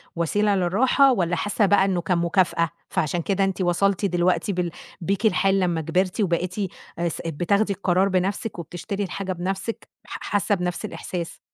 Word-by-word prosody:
وسيلة 200 +5 +1
للراحة 250 +9 +4
والّا 175 -6 0
حاسّة 205 +5 +1
بقى 200 0 +4
إنه 185 -3 0
كان 175 +1 0
مكافأة، 170 -1 +2 0.2
فعشان 165 +3 0
كده 195 +3 0
أنتِ 195 -1 -1
وصلتِ 195 +3 +2
دلوقتي 180 +2 +1
بال 175 -2 -1 0.3
بيكِ 195 +6 -1
الحال 195 -1 +3
لمّا 175 -3 +1
كبرتِ 180 +6 0
وبقيتِ 180 -1 0 0.4
آآ 170 - +1
س - - -6
بتاخدي 200 +6 +1
القرار 185 0 +2
بنَفْسِك 190 +2 -1
وبتشتري 175 +5 -4
الحاجة 190 0 -3
بنَفْسِك 190 +5 -4 0.2
ح - - -6
حاسّة 205 0 +2
بنَفْس 180 +2 -3
الإحساس؟ 175 -4 -5
185 Hz, 160 wpm, -24 LUFS, 175-200 Hz, 0.4 s, للراحة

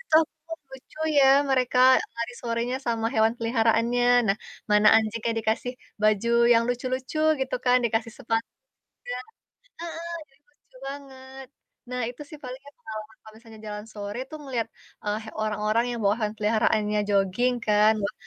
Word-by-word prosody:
itu - - -3 0.4
aku 325 - -8
lucu 265 +3 -13 0.2
ya, 275 - +7 0.3
mereka 255 -1 +2 0.4
lari 235 +1 -3
sorenya 235 +1 -1
sama 230 -1 0
hewan 220 -1 +4
peliharaannya. 230 +1 +2 0.2
Nah, 195 - +3 0.3
mana 210 0 +5
anjingnya 225 +1 0
dikasih 225 +3 -1 0.3
baju 215 +1 +3 0.2
yang 230 -1 +5
lucu-lucu 255 +3 -2 0.2
gitu 265 0 -1
kan, 250 0 +5
dikasih 225 0 0
sepatu 225 -3 -1 1.1
juga - - -32
heeh, 335 0 -6 0.4
jadi - - -32
lucu - - -29
banget. 265 -1 -9 0.4
Nah, 250 0 -2
itu 245 +4 -10
sih 305 - -9
paling 255 0 -7
ya - - -11
pengalaman 220 -6 -9
kalau 215 - -15
misalnya 225 -1 -14
jalan 210 0 -6
sore 205 +1 -6
tuh 310 - -7
ngeliat, 255 -5 -2 0.4
eee, 210 0 -1
he 220 - -8
orang-orang 215 +1 +1
yang 240 -1 -3
bawa 200 +1 +3
hewan 215 -1 -2
peliharaannya 210 0 +1
jogging 200 +5 +2
kan, 210 +1 +5
wah, 200 - -1
230 Hz, 160 wpm, -26 LUFS, 215-255 Hz, 1.1 s, ya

